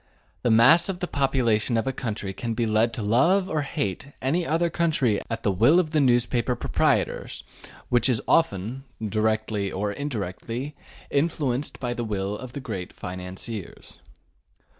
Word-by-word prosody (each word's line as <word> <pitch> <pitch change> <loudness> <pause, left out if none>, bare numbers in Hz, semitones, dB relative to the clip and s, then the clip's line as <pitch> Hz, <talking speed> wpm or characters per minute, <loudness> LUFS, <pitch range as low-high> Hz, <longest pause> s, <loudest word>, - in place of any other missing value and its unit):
The 120 - +1
mass 135 - +6
of 190 - -2
the 180 - -1
population 125 -7 +1
of 115 - 0
a 135 - -1
country 110 -6 -4
can 115 +3 -4
be 120 - 0
led 110 +1 +2
to 110 - -3
love 170 - +3
or 155 -4 0
hate 135 0 -3
any 165 +7 0
other 165 +2 +1
country 150 -11 +1
at 115 - -4
the 100 - +2
will 120 - +5
of 160 -4 0
the 155 -2 +3
newspaper 120 -1 +2
proprietors, - - 0 0.5
which 120 +2 +3
is 120 -4 +2
often, 120 - +1 0.2
directly 110 -2 0
or 100 +2 -2
indirectly, 120 +2 -4 0.4
influenced 140 -3 0
by 120 -2 -2
the 120 - -3
will 100 -2 -2
of 125 +3 -8
the - - -5
great 100 -9 -5
financiers. 90 +3 -7
120 Hz, 160 wpm, -25 LUFS, 110-140 Hz, 0.5 s, mass